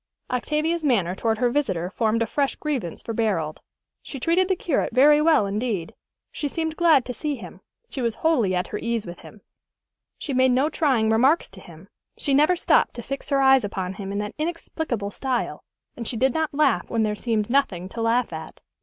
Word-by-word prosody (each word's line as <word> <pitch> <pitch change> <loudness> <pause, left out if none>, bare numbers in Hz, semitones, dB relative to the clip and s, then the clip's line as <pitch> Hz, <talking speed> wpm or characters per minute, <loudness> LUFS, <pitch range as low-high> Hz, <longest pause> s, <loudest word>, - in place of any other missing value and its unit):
Octavia's 305 +6 -1
manner 205 - +2
toward 220 +3 -1
her 245 0 +1
visitor 190 - -1
formed 225 +1 +1
a - - -1
fresh 275 +5 -1
grievance 260 - -4
for 230 - -4
Barold. 190 -9 -1 0.4
She 275 - -8
treated 345 +7 +2
the 380 - +1
curate 305 -8 -1
very 295 +3 +6
well 310 -9 +4
indeed. 200 -3 -2 0.4
She 295 - -3
seemed 320 +2 -3
glad 320 -7 +4
to 250 - -4
see 295 +5 -3
him, - - -11 0.3
she 270 - -5
was 235 -2 -1
wholly 235 - +3
at 180 +1 0
her 210 - -4
ease 235 -2 -2
with 175 - -9
him, - - -14 0.8
she 280 - -4
made 260 0 +4
no 270 +5 +2
trying 245 -8 +2
remarks 265 +9 +3
to - - -13
him, - - -14 0.3
she 280 - 0
never 300 +6 +4
stopped - - +2
to 240 - -6
fix 275 +3 -6
her 275 -1 +2
eyes 265 -2 +5
upon 190 -2 -3
him 195 0 -6
in 200 - -3
that 210 0 -3
inexplicable 310 -9 -3
style, 255 +2 -3 0.3
and 235 -2 -6
she 235 - -3
did 260 +2 +2
not 320 -1 -1
laugh 300 +1 +1
when 230 -1 +1
there 210 -1 0
seemed 215 -1 -1
nothing 235 -9 0
to 230 - -6
laugh 230 -3 +1
at. 160 0 -8
245 Hz, 205 wpm, -24 LUFS, 210-295 Hz, 0.8 s, very